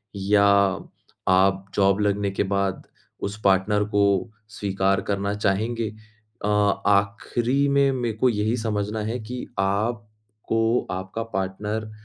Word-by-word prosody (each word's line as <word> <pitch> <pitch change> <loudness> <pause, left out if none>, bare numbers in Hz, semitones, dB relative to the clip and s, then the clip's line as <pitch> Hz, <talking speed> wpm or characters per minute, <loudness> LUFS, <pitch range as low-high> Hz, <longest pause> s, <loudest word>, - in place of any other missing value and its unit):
या 100 +1 +3 0.8
आप 95 +1 +3
जॉब 100 0 +3
लगने 100 -1 0
के 95 - 0
बाद 100 -1 -2 0.4
उस 100 +2 -4
पार्टनर 100 +2 +3
को 105 -1 +2 0.5
स्वीकार 95 -1 0
करना 100 0 -2
चाहेंगे? 110 +3 0 0.6
अ, - - 0
आखिरी 105 +6 +1
में, 140 0 +3
मैं 120 -4 -2
को 130 +3 +3
यही 110 0 0
समझना 105 -1 -2
है 115 +4 -3
कि 125 +3 -6
आपको 110 +2 -1
आपका 95 +4 -4
पार्टनर 105 +3 -3
105 Hz, 120 wpm, -24 LUFS, 100-110 Hz, 0.8 s, या